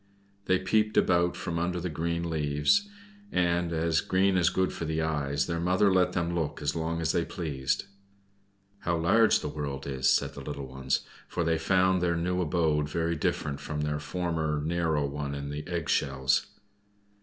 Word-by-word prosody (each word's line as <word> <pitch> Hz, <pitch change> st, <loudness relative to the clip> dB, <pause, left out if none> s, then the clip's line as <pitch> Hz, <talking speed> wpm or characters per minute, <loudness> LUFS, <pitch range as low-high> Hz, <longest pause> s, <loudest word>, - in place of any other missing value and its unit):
They 95 Hz, -1 st, +3 dB
peeped 110 Hz, +3 st, +1 dB
about 85 Hz, -1 st, +3 dB
from 85 Hz, 0 st, -3 dB
under 90 Hz, +1 st, -1 dB
the 90 Hz, -, -3 dB
green 85 Hz, +1 st, -2 dB
leaves; 75 Hz, -, +1 dB, 0.4 s
and 85 Hz, -1 st, +1 dB
as 80 Hz, -1 st, +1 dB
green 95 Hz, +1 st, +2 dB
is 90 Hz, -3 st, +4 dB
good 95 Hz, 0 st, 0 dB
for -, -, -5 dB
the 80 Hz, 0 st, -1 dB
eyes, 70 Hz, -3 st, 0 dB
their 85 Hz, -1 st, -2 dB
mother 95 Hz, +3 st, +3 dB
let 90 Hz, -1 st, +3 dB
them 85 Hz, -1 st, -1 dB
look 80 Hz, -4 st, -2 dB
as 75 Hz, +1 st, -1 dB
long 85 Hz, 0 st, -2 dB
as 80 Hz, -, +1 dB
they -, -, +1 dB
pleased. 70 Hz, -5 st, -2 dB, 0.9 s
"How 85 Hz, 0 st, 0 dB
large 105 Hz, +7 st, +4 dB
the -, -, -3 dB
world 70 Hz, -2 st, -4 dB
is!" 65 Hz, -1 st, +1 dB
said -, -, +1 dB
the -, -, -8 dB
little 70 Hz, -2 st, -5 dB
ones, 65 Hz, 0 st, -1 dB, 0.3 s
for 85 Hz, -, -2 dB
they 80 Hz, 0 st, +1 dB
found 95 Hz, +2 st, +3 dB
their 85 Hz, -1 st, +1 dB
new 90 Hz, +2 st, 0 dB
abode 75 Hz, -3 st, +1 dB
very 85 Hz, +2 st, 0 dB
different 75 Hz, -2 st, -1 dB
from 75 Hz, 0 st, -4 dB
their 75 Hz, 0 st, -1 dB
former 80 Hz, -3 st, -2 dB
narrow 80 Hz, -3 st, +1 dB
one 70 Hz, 0 st, -4 dB
in 70 Hz, 0 st, -5 dB
the 75 Hz, +1 st, -6 dB
egg 85 Hz, -3 st, -3 dB
shells. 65 Hz, 0 st, +1 dB
80 Hz, 180 wpm, -28 LUFS, 75-90 Hz, 0.9 s, is